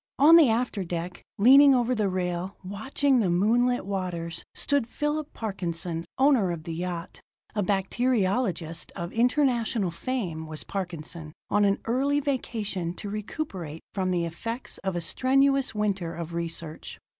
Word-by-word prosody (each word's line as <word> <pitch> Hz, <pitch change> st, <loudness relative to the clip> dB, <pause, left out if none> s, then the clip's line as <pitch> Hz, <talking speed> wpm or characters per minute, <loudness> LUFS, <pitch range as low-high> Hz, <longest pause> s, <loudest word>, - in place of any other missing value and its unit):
On 305 Hz, +4 st, +8 dB
the 320 Hz, -7 st, +7 dB
after 225 Hz, -3 st, 0 dB
deck, 175 Hz, 0 st, -5 dB, 0.2 s
leaning 275 Hz, +6 st, +8 dB
over 245 Hz, 0 st, +2 dB
the 215 Hz, -4 st, +1 dB
rail, 180 Hz, +1 st, -2 dB
watching 250 Hz, +8 st, +1 dB
the 200 Hz, -5 st, +2 dB
moonlit 235 Hz, +8 st, +2 dB
waters, 180 Hz, -4 st, -3 dB
stood 285 Hz, -5 st, +1 dB
Phillip 295 Hz, +2 st, -2 dB
Parkinson, 175 Hz, -5 st, -4 dB
owner 265 Hz, -8 st, +4 dB
of 170 Hz, -2 st, -4 dB
the 165 Hz, -, -5 dB
yacht. 175 Hz, 0 st, -5 dB, 0.3 s
A 210 Hz, -, 0 dB
bacteriologist 195 Hz, -3 st, 0 dB
of 170 Hz, +1 st, -5 dB
international 235 Hz, -5 st, +2 dB
fame 170 Hz, -6 st, -3 dB
was 155 Hz, -1 st, -6 dB
Parkinson, 170 Hz, -4 st, -5 dB, 0.2 s
on 205 Hz, 0 st, +4 dB
an 200 Hz, 0 st, +3 dB
early 275 Hz, +5 st, +1 dB
vacation 215 Hz, -10 st, -2 dB
to 205 Hz, +1 st, -6 dB
recuperate 200 Hz, -, -5 dB
from 190 Hz, -2 st, -1 dB
the 175 Hz, -2 st, +1 dB
effects 230 Hz, +9 st, -5 dB
of 190 Hz, -2 st, -3 dB
a 175 Hz, -, -1 dB
strenuous 270 Hz, +6 st, +2 dB
winter 195 Hz, -5 st, -1 dB
of 170 Hz, 0 st, -6 dB
research. 165 Hz, -1 st, -5 dB
200 Hz, 145 wpm, -27 LUFS, 170-250 Hz, 0.3 s, On